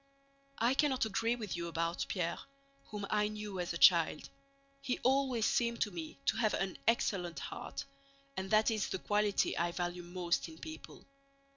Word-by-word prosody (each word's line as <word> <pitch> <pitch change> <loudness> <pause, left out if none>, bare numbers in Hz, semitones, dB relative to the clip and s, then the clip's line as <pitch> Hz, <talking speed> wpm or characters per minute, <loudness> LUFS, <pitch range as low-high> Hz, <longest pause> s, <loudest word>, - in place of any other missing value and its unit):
I 235 +3 +3
cannot 270 -4 +2
agree 225 +3 +1
with 215 -7 -4
you 170 0 -3
about 165 +1 -1
Pierre, 170 -3 -1 0.5
whom 205 -1 -5
I 210 0 +3
knew 210 -2 -5
as 175 - -2
a 170 - -2
child. 170 -3 +5 0.5
He 260 -3 -1
always 260 -3 +3
seemed 235 -1 +1
to 210 - +1
me 165 -5 -6
to 225 - +2
have 220 -2 +2
an 195 -1 -2
excellent 185 -7 +1
heart, - - -5 0.5
and 190 -2 -3
that 215 +1 +4
is 215 -3 -1
the - - -1
quality 205 +1 +1
I 170 +1 0
value 175 0 -3
most 175 -1 -1
in 160 - -12
people. 160 -1 -10
200 Hz, 170 wpm, -34 LUFS, 175-225 Hz, 0.5 s, child